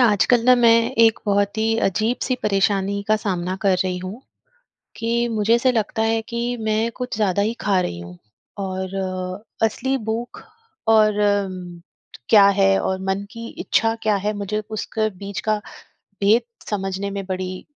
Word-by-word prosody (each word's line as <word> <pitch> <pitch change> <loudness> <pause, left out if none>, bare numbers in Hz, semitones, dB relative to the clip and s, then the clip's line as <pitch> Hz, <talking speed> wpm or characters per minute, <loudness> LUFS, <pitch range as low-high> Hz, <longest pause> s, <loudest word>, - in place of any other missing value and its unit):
आजकल 230 +1 +4
ना 255 +1 +7
मैं 240 -2 +5 0.3
एक 225 -1 +5
बहुत 200 0 +1
ही 225 +1 +1
अजीब-सी 225 +6 -1
परेशानी 200 0 +1
का 215 - +4
सामना 185 -3 -2
कर 195 -2 +3
रही 180 -1 -2
हूँ, 185 +6 -7 0.8
कि 235 +1 0
मुझे 220 0 +2
ऐसा 240 +2 +3
लगता 220 -2 -1
है 225 0 +1
कि 240 +1 -2
मैं 220 +1 0
कुछ 250 -3 -4
ज़्यादा 200 -2 +1
ही 220 +3 0
खा 195 -3 +2
रही 85 - -3
हूँ 85 +1 -10 0.4
और 190 -1 -4 0.7
असली 255 +5 +1
भूख 230 +2 -4 0.5
और 215 -1 +4
उम, 190 -4 -1 0.5
क्या 205 -2 +7
है 195 0 +4
और 190 - -1
मन 195 +1 -1
की 230 0 -8
इच्छा 225 0 +1
क्या 215 -2 +2
है, 205 +2 -1
मुझे 205 +1 -3
उसके 215 0 -2
बीच 200 0 -5
का 215 0 +2 0.6
भेद 210 +4 +4 0.3
समझने 195 -1 -3
में 200 0 -4
बड़ी 185 -1 -4
210 Hz, 160 wpm, -21 LUFS, 195-225 Hz, 0.8 s, ना